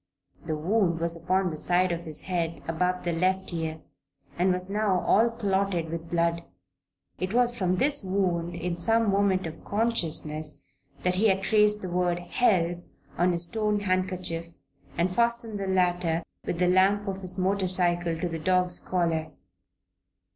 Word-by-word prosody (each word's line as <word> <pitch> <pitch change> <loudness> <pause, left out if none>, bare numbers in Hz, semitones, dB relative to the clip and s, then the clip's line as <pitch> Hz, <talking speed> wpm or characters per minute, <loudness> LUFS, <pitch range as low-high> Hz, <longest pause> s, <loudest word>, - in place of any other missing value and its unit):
The 155 - -1
wound 170 +1 +1
was 170 0 -1
upon 180 +2 0
the 155 - -5
side 180 +3 +2
of 170 0 -4
his 155 -2 -5
head 170 -3 -3
above 180 +3 0
the 175 - 0
left 185 +2 0
ear 160 -1 -3 0.5
and 180 +2 +2
was 180 0 -1
now 200 -2 +1
all 225 +3 +4
clotted 195 -6 -1
with 165 0 -5
blood. 170 0 +1 0.8
It 185 +5 -2
was 245 -1 +3
from 185 -6 0
this 280 +5 +1
wound, 180 -3 -1
in 170 0 -3
some 225 +4 +2
moment 195 -2 +2
of 160 -1 -8
consciousness, 160 -8 -2 0.4
that 180 0 +2
he 220 +3 +4
had 195 -1 +2
traced 210 0 +3
the 185 - -4
word 175 -1 +1
"Help" 175 -2 +1 0.3
on 180 +1 +2
his 170 0 0
torn 210 +2 -1
handkerchief, 185 -3 -1 0.5
and 175 +2 +1
fastened 235 -2 +1
the 195 - -3
latter, 175 -3 +1 0.2
with 170 - -1
the 180 +1 +2
lamp 195 +3 +3
of 195 0 -3
his 185 0 0
motorcycle, 180 -3 +1
to 175 - -1
the 165 -1 -4
dog's 180 +1 +1
collar. 165 -3 -1
180 Hz, 160 wpm, -27 LUFS, 170-195 Hz, 0.8 s, all